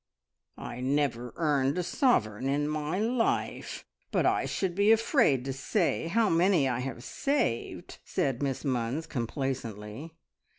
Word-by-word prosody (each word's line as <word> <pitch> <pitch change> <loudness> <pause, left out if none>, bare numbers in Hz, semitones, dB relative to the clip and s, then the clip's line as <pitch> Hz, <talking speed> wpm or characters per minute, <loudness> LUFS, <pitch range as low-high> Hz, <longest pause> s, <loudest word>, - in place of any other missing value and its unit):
"I - - -7
never 130 -3 0
earned 145 -3 +1
a 180 - 0
sovereign 130 - +1
in 145 +1 +1
my 150 +3 -2
life, 230 +3 -1 0.2
but - - +1
I - - +2
should 190 -3 -1
be 200 +4 +4
afraid 225 - +3
to 135 - -2
say 165 - 0
how 220 +6 +2
many 170 -4 +3
I 125 -2 -1
have 125 -2 -5
saved!" 275 - -2
said 135 -2 -1
Miss 135 -2 -2
Munns 130 +3 -1
complacently. 125 0 -4
145 Hz, 135 wpm, -29 LUFS, 125-180 Hz, 0.2 s, be